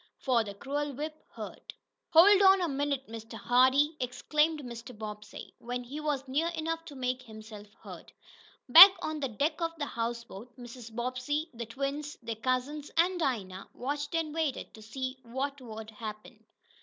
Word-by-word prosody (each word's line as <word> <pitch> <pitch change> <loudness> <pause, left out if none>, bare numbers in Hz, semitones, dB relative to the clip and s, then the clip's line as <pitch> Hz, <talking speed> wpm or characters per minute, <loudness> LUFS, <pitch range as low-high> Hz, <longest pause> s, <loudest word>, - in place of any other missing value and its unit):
For 245 -4 +2
the 200 -2 -8
cruel 285 +6 -3
whip 305 +3 -6
hurt. - - -9 0.4
"Hold 390 +5 +7
on 385 0 +7
a 355 - 0
minute, 280 -2 -2
Mr. 225 0 -9
Hardee!" 260 +5 +3
exclaimed 300 +5 0
Mr. 235 -1 -9
Bobbsey, 210 -1 -8
when 245 +1 -4
he 275 +5 -7
was 290 -3 -2
near 290 +6 0
enough 325 +1 -3
to 290 - -10
make 255 -1 -2
himself 215 -3 -11 0.2
heard. - - -11 0.6
Back 350 +9 +12
on 310 0 -3
the 275 - -1
deck 295 +9 -1
of 330 0 -1
the 290 - -2
houseboat 235 -1 -5
Mrs. 240 -2 -10
Bobbsey, 255 +6 -2
the 235 -1 -6
twins, 280 +4 -4
their 230 0 -3
cousins 255 +6 -2
and 355 +2 +3
Dinah 200 - -2
watched 290 +4 -3
and 320 -2 -1
waited 315 -4 -2
to 220 - -13
see 260 +4 -5
what 265 +3 -4
would 220 -2 -8
happen. 215 +1 -9
260 Hz, 165 wpm, -30 LUFS, 230-300 Hz, 0.6 s, Back